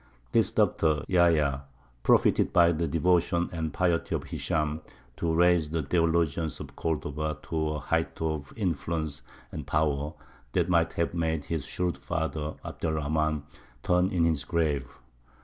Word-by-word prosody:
This - - +3
doctor, 80 -2 +2
Yahya, 80 -7 +3 0.4
profited - - +4
by 85 -1 +5
the 85 0 -1
devotion 85 +2 +2
and 80 -2 -2
piety 85 -2 0
of - - -3
Hishām 75 -1 -2 0.4
to 85 - 0
raise 85 -1 +3
the 80 0 -1
theologians 80 0 +1
of - - -9
Cordova 75 -1 -2
to 80 -1 -1
a 75 - -3
height 80 +3 -1
of 80 -3 -2
influence 80 - -2 0.3
and 75 -3 -6
power 75 0 0 0.4
that - - +1
might 85 -2 +2
have 85 - -1
made 80 -3 -1
his 80 -4 -3
shrewd 90 -1 -2
father, 80 -2 -3
Abd - - -5
er 80 - +1
Rahmān, 75 0 0 0.4
turn 90 +1 +3
in 90 -3 +1
his 80 -4 +1
grave. 75 -5 0
80 Hz, 150 wpm, -28 LUFS, 75-85 Hz, 0.4 s, by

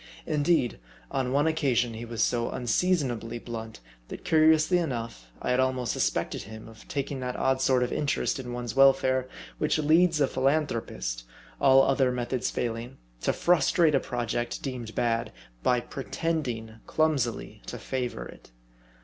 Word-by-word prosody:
Indeed, 150 - +1 0.3
on 130 -2 -1
one 145 +3 +2
occasion 135 -7 +1
he 115 +1 -6
was 115 -1 -1
so 120 -1 0
unseasonably 125 - 0
blunt, 115 - -7 0.3
that - - -8
curiously 160 +2 +4
enough, 115 - -4
I - - -2
had 125 - +2
almost 130 -2 +1
suspected - - -1
him 110 +2 -10
of 110 -1 -14
taking 140 -1 -3
that 125 -1 -3
odd 130 0 +1
sort 130 -2 +3
of 125 - -2
interest 145 -1 0
in 125 -2 -6
one's 120 0 -4
welfare, 130 -1 +4 0.3
which 150 0 +1
leads 160 +2 +4
a 140 - +5
philan 140 +5 +2
thropist, - - -4 0.4
all 135 0 +6
other 135 -1 +2
methods 125 0 -2
failing, 120 +2 -4 0.2
to - - +2
frustrate 170 -1 +3
a 135 - +4
project 120 -1 -3
deemed 125 -5 -5
bad, 115 -1 0 0.3
by 125 - +3
pretending 125 -5 -3
clumsily 145 -7 0
to - - -5
favor 125 - -4
it. - - -13
130 Hz, 150 wpm, -27 LUFS, 120-145 Hz, 0.4 s, all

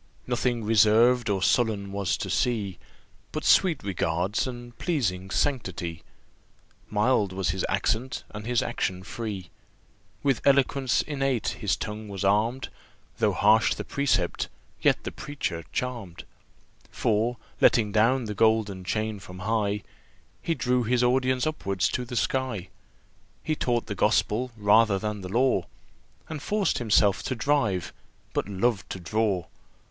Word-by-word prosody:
Nothing 120 -1 0
reserved 115 +3 +4
or 100 -2 0
sullen 105 -5 +1
was 100 -2 -1
to 95 - -4
see, 100 -3 0 0.5
But - - -4
sweet 170 -7 +4
regards, 90 +3 -1
and 120 -1 -8
pleasing 95 - -1
sanctity, 95 - -2 0.9
Mild 105 -2 +2
was 95 -2 -1
his 95 0 -3
accent, 110 +6 -1
and 105 +1 -7
his 120 -1 +2
action 95 0 -2
free. 105 -6 -6 0.7
With 135 -4 +2
eloquence 140 -1 +3
innate 135 -5 -1
his 105 - -1
tongue 105 0 -6
was 100 -1 -5
arm'd, 110 +6 +1 0.5
Though - - +3
harsh 105 0 +4
the - - -5
precept, 115 -11 0 0.3
yet - - +3
the - - -4
preacher 95 - -4
charm'd; 110 -9 -4 0.7
For, 115 +3 0 0.2
letting 110 -3 +4
down 115 +4 +3
the 105 - -4
golden 105 -3 +2
chain 110 +2 -2
from 90 -1 -11
high, 105 0 -1 0.6
He 165 - -1
drew 125 -3 +1
his 125 +2 +1
audience 130 +1 +2
upwards 100 - 0
to 125 - -2
the 120 - -7
sky. 115 -6 -1 0.7
He 155 - 0
taught 120 -5 0
the - - -4
Gospel 125 +5 +1
rather 105 0 +4
than 105 +1 -3
the 90 - -7
law, 120 -4 +2 0.6
And 155 -3 -6
forced 205 +4 0
himself 105 -4 +3
to 130 - -3
drive, 115 - 0 0.4
but - - -1
loved 100 +1 0
to 95 - -5
draw. 95 0 0
110 Hz, 140 wpm, -26 LUFS, 100-125 Hz, 0.9 s, reserved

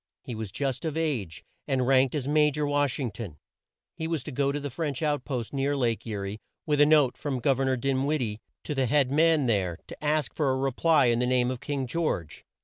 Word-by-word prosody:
He 125 - -6
was 110 -3 -5
just 135 +3 -2
of 160 -1 -2
age, 130 - -2 0.2
and 130 -2 +1
ranked 130 +1 +3
as 140 -3 -2
Ma 150 0 +4
jor 150 +1 -2
Wash 145 -2 +1
ing 125 -5 -2
ton. 105 -8 -8 0.6
He 160 - -4
was 165 -5 -2
to - - -6
go 140 +2 +1
to 145 - -2
the 145 -1 -5
French 150 0 -3
out 145 -3 0
post 125 -4 -4
near 140 +1 0
Lake 120 -3 -1
E 110 - -3
rie, 100 +1 -4 0.3
with 150 -2 +2
a 145 - +7
note 150 -5 +4
from 140 -4 -3
Gov 135 +1 +2
er 135 - +1
nor 130 -1 +1
Din 135 +1 0
wid 155 +1 +1
die 105 -3 -3 0.2
to 150 - -3
the 135 -2 +1
head 135 0 +2
man 160 -1 +4
there, 100 -7 +1
and - - -37
to - - -10
ask 150 0 +1
for 150 -4 0
a 130 - +1
re 135 0 0
ply 155 +1 +3
in 120 -1 +3
the 125 - +1
name 125 0 +2
of 130 - -5
King 140 -1 -3
George. 120 - -2
135 Hz, 255 wpm, -27 LUFS, 120-150 Hz, 0.6 s, a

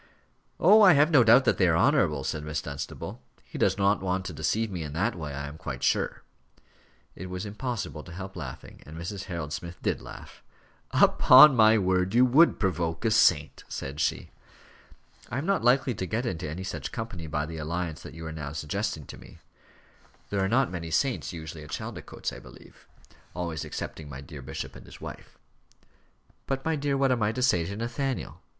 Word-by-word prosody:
"Oh! 210 +6 +7
I 190 -4 +8
have 150 +3 +4
no 140 -6 +7
doubt 120 +4 +6
that - - +2
they 90 - +5
are 80 -1 +3
honourable," 90 - +2
said 75 +3 -3
Miss 75 -1 -3
Dunstable. 70 -1 -6 0.2
"He - - -9
does - - +2
not 100 0 +2
want 95 0 -1
to 95 - -5
deceive 105 +8 -1
me 90 -3 -4
in 75 -2 -6
that 85 +6 0
way, 75 -4 -6
I 70 +1 -5
am 75 +2 -10
quite 65 -3 -6
sure." - - 0 0.9
It 90 +1 -8
was 90 +2 -5
impossible 105 -6 -4
to 90 - -11
help 95 +2 -8
laughing, 75 -8 -8
and 80 +2 -11
Mrs. 90 +3 -5
Harold 80 -4 -5
Smith 85 +2 -7
did - - -1
laugh. - - -11 0.5
"Upon 135 +2 +7
my 110 -1 +6
word, 95 0 +1
you 125 +1 +6
would 145 +7 +5
provoke 85 -2 -1
a 110 - +3
saint," 80 -9 +3
said 70 +2 -6
she. 80 - -1 1.0
"I 120 - -3
am 140 - -2
not 195 -6 +1
likely 125 +1 +3
to 95 -3 -4
get 115 +6 -2
into 80 -9 -3
any 85 +5 -5
such 95 - -5
company 90 -8 -6
by 75 0 -2
the 80 +1 -7
alliance 85 +1 -3
that - - -10
you 80 0 -8
are 80 - -5
now 75 -3 -6
suggesting 75 -2 -3
to - - -11
me. - - -14 0.9
There 100 -1 +1
are 95 - 0
not 125 +1 +2
many 85 -2 -5
saints 130 +9 0
usually 80 -2 -8
at 75 - -12
Chaldicotes, - - -5
I - - -8
believe; - - -16 0.5
always 85 -3 -3
excepting 75 -2 -6
my 70 -1 -8
dear 70 +1 -10
bishop 65 +1 -6
and - - -13
his - - -13
wife." - - -10 1.1
"But, 135 0 -2
my 160 0 +1
dear, 140 -1 -1
what 135 -1 +2
am 125 -2 +1
I 105 0 +2
to 125 - -2
say 90 -10 +3
to 100 - -5
Nathaniel?" 120 +4 -3
90 Hz, 200 wpm, -27 LUFS, 80-120 Hz, 1.1 s, I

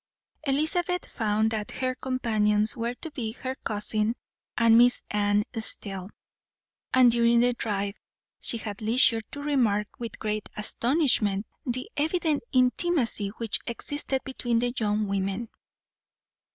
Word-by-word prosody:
Elizabeth 345 +6 0
found 220 0 0
that 215 -2 -3
her 255 0 -2
companions 215 -5 +1
were 235 +1 -3
to 320 +5 -9
be 225 -6 -4
her 260 +1 -5
cousin 215 -1 +2 0.4
and 230 -1 +5
Miss 245 +1 +5
Anne 205 0 +2 0.2
Steele; 195 -3 -1 0.8
and 255 -2 +6
during 235 0 +4
the 245 +1 +3
drive 205 -4 -2 0.5
she 235 - 0
had 210 -2 -7
leisure 225 +1 +5
to 285 - -7
remark, 230 -8 +1
with 235 -3 -6
great 215 -1 -3
astonishment, 220 -3 +1 0.2
the 255 +1 -2
evident 315 0 0
intimacy 255 - +2
which 230 -3 0
existed 265 +2 -2
between 245 -3 -2
the 240 +1 0
young 210 -2 0
women. 195 +3 -2
230 Hz, 125 wpm, -27 LUFS, 210-255 Hz, 0.8 s, and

